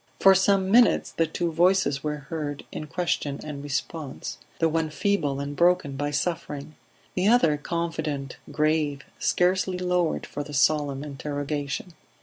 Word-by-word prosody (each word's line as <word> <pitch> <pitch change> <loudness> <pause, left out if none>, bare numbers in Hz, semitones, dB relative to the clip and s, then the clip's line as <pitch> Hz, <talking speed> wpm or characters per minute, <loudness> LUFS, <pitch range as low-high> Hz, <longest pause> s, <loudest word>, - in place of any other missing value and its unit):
For 195 - +8
some, 190 0 +3
minutes 235 +2 +5
the 165 - +1
two 170 +2 -2
voices 165 -4 +2
were 150 -1 -2
heard 150 -3 -4
in 155 - -6
question 160 -4 -1
and 150 -2 -6
response; 140 -4 -4 0.2
the 165 - +3
one 160 0 0
feeble 155 -5 0
and 140 +1 -4
broken 170 -4 +3
by 145 +1 -1
suffering; 150 -1 -3 0.4
the 185 +2 +1
other 215 -10 +5
confident, 155 -3 -3
grave, 150 -2 +1 0.2
scarcely 185 +1 +2
lowered 180 -2 0
for 145 - -5
the 145 0 -7
solemn 145 -1 +2
interrogation. 145 +2 -4
155 Hz, 140 wpm, -26 LUFS, 145-175 Hz, 0.4 s, For